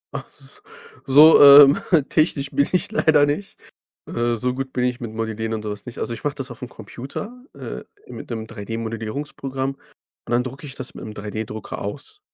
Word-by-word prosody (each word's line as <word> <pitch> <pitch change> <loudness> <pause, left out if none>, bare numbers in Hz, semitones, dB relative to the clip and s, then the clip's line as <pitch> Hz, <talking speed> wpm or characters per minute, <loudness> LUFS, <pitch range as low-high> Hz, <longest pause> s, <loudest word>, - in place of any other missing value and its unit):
Ach - - -5
s 420 - -15 0.5
so, 150 +4 +8
ähm, 140 0 +10 0.3
technisch 145 -3 0
bin 140 - +2
ich 190 +3 0
leider 155 -9 +4
nicht. 150 +8 -4 0.5
Äh, 120 0 -1
so 125 +3 -2
gut 135 0 -5
bin 125 - -1
ich 125 0 -1
mit 115 -4 -6
Modellieren 110 0 -3
und 110 - -6
sowas 105 -1 -6
nicht. 125 - -8
Also, 120 - -3
ich - - -9
mache 145 -1 -1
das 135 -3 -6
aufm 120 +1 -8
Computer, 140 - -9
äh, - - -7 0.2
mit - - -9
'nem 110 -2 -4
3D-Modellierungsprogramm, 115 +5 -5
und - - -18
dann 120 +1 +2
drucke 130 +4 -8
ich 135 - -8
das 130 -2 -7
mit'm 110 - -8
3D-Drucker 105 +1 -6
aus. 140 - -7
125 Hz, 180 wpm, -22 LUFS, 110-145 Hz, 0.5 s, ähm